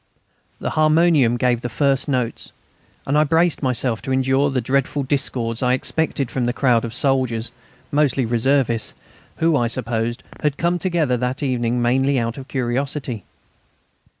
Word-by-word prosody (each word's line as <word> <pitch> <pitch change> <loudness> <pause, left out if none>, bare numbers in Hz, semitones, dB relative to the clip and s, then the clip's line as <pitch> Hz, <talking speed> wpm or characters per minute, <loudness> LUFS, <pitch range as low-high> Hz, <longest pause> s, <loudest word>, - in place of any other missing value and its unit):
The - - -3
harmonium 155 -5 +3
gave 120 -1 +1
the 120 - -4
first 140 +3 +1
notes, 125 -5 -2 0.5
and 140 - 0
I 150 - +5
braced 165 +2 +2
myself 125 -3 0
to 130 - -5
endure 130 +2 +2
the 135 -2 0
dreadful 135 +3 0
discords 125 -4 -1
I 125 -1 +2
expected 140 -1 -1
from 125 -2 -1
this 120 - -1
crowd 125 -4 +2
of 115 - -4
soldiers 125 -2 0 0.4
mostly 145 -3 +2
reservists 120 0 0 0.4
who, 165 -1 +2
I 120 -4 +2
supposed, 120 0 -2 0.2
had 150 -1 -1
come 175 +1 0
together 165 -8 0
that 125 +3 -2
evening 120 -2 0
mainly 135 +3 +2
out 115 +1 -2
of 135 - -10
curiosity. 130 -3 -3
130 Hz, 150 wpm, -21 LUFS, 120-145 Hz, 0.5 s, I